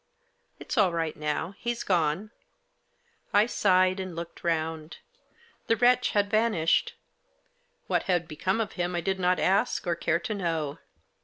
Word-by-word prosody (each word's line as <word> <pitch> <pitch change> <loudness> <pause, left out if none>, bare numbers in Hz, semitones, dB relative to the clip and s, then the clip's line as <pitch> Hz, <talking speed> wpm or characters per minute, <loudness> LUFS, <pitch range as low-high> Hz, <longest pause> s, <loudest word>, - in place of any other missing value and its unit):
" - - -44
It's 250 - -3
all 195 -4 +4
right 165 -2 -2
now; 150 +4 -3
he's 240 0 -3
gone." 175 +3 0 1.0
I 205 +1 +5
sighed, 185 -4 +2
and 185 -2 -5
looked 170 0 -8
round. 160 -1 -2 0.7
The 230 - +3
wretch 245 +2 +3
had 205 -1 +2
vanished. 215 -7 +2 0.9
What - - +1
had 175 -2 +1
become 185 +7 -1
of 215 -2 -1
him 175 0 -2
I 175 - 0
did 190 +2 -1
not 180 0 +2
ask, 200 +6 +1
or 175 - +1
care 170 -1 0
to 220 +3 -4
know. 165 -6 -2
180 Hz, 155 wpm, -27 LUFS, 165-205 Hz, 1.0 s, I